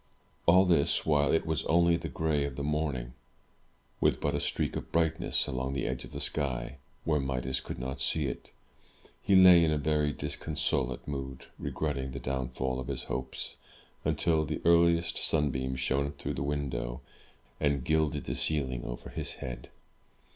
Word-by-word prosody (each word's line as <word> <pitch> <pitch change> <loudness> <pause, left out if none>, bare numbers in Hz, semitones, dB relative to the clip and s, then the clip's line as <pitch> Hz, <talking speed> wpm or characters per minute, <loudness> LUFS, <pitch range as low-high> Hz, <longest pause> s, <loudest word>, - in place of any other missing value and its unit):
All 90 +3 +7
this 85 -6 +2
while, 75 -2 +3
it 80 - +2
was 80 -1 -1
only 85 +1 +4
the 85 -1 -4
gray 75 0 0
of 70 -2 -4
the 70 - -4
morning, 70 -5 -1 0.9
with - - +2
but - - 0
a - - 0
streak - - -1
of - - -5
brightness 80 -1 +2
along 65 +1 -2
the 70 -2 -1
edge 65 0 -2
of - - -11
the - - -5
sky, 65 -3 -2 0.3
where 75 -2 +2
Midas 65 -1 -1
could - - -6
not 65 +2 -4
see 75 +3 +1
it. 65 - -5 0.7
He 100 - +3
lay 90 -2 +9
in 80 - +3
a 75 - +1
very 75 0 +1
disconsolate 70 -4 -2
mood, 65 -2 -5
regretting 70 -4 -2
the 70 - -4
downfall 65 0 -2
of 65 - -5
his - - -3
hopes, 65 - -5 0.5
until 80 -2 +2
the 75 - -3
earliest 85 0 +4
sunbeam 65 -4 0
shone 70 +2 0
through - - -4
the - - -4
window, 70 -4 -2 0.6
and 70 -3 +1
gilded 80 -2 +1
the - - -2
ceiling 65 -6 0
over - - -7
his - - -4
head. 65 -2 -7
70 Hz, 170 wpm, -30 LUFS, 65-80 Hz, 0.9 s, lay